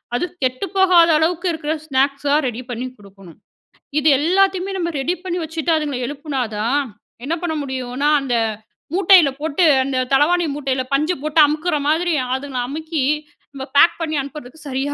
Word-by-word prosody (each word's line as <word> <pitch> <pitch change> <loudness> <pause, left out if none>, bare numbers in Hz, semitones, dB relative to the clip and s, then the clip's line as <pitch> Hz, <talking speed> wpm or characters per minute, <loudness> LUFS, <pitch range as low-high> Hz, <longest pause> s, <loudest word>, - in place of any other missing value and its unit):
அது 355 - 0 0.2
கெட்டுப்போகாத 345 +5 +3
அளவுக்கு 345 +3 0
இருக்கிற 315 -1 -3
ஸ்நாக்ஸா 275 0 0
ரெடி 240 +1 -4
பண்ணி 245 +1 -4
குடுக்கணும். 195 -4 -16 0.6
இது 310 - 0
எல்லாத்தையுமே 380 +3 +1
நம்ம 340 -1 -2
ரெடி 340 +7 -1
பண்ணி 360 -1 -3
வச்சுட்டு, 320 +1 -2
அதுங்கள 290 -5 -2
எழுப்புனா 285 -1 -4 0.2
தான் 235 +7 +1 0.5
என்ன 325 +4 -1
பண்ண 320 -2 -1
முடியுன்னா, 260 +1 -2
அந்த 250 -3 -1 0.6
மூட்டையில 370 -5 +6
போட்டு 320 +3 +1 0.2
அந்த 260 -1 -2
தலவாணி 335 +6 +3
மூட்டையில 265 -3 -2
பஞ்ச 305 +5 +2
போட்டு 310 +1 +1
அமுக்குற 310 +3 -1
மாதிரி, 340 +2 +1 0.2
அதுங்கள 265 -2 -4
அமுக்கி 315 0 -3 0.5
நம்ப 265 -1 -6
பேக் 335 +3 +5
பண்ணி 315 -2 -2
அனுப்பறதுக்கு 280 +1 -10
சரியா 275 +2 -2
300 Hz, 150 wpm, -19 LUFS, 265-335 Hz, 0.6 s, மூட்டையில